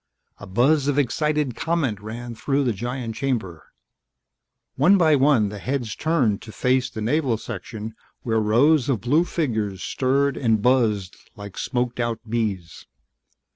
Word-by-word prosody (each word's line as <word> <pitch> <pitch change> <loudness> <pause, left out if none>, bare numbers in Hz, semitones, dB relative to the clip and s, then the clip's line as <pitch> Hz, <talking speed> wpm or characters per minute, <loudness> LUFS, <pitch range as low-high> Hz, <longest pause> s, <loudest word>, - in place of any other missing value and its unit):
A 105 - -10
buzz 135 +9 +2
of 145 -1 +1
excited 145 0 0
comment 155 -11 -1
ran 115 +3 -7
through 140 +5 0
the 120 -3 +1
giant 120 +2 -4
chamber. 110 - -3 1.0
One 175 +9 +5
by 160 -4 +4
one 135 -7 +3
the 105 0 -7
heads 125 -1 -3
turned 135 -11 +1
to 110 - -10
face 125 +5 +1
the 110 - -7
Naval 125 -1 +1
section 110 0 -7 0.3
where 110 -2 +1
rows 125 +7 +3
of 125 -6 +1
blue 150 +8 +2
figures 110 - -2
stirred 140 0 0
and 115 -4 +2
buzzed 110 -6 +1 0.2
like 100 -3 -9
smoked 125 -1 -2
out 120 -1 -1
bees. 105 -7 -3
120 Hz, 145 wpm, -23 LUFS, 110-140 Hz, 1.0 s, One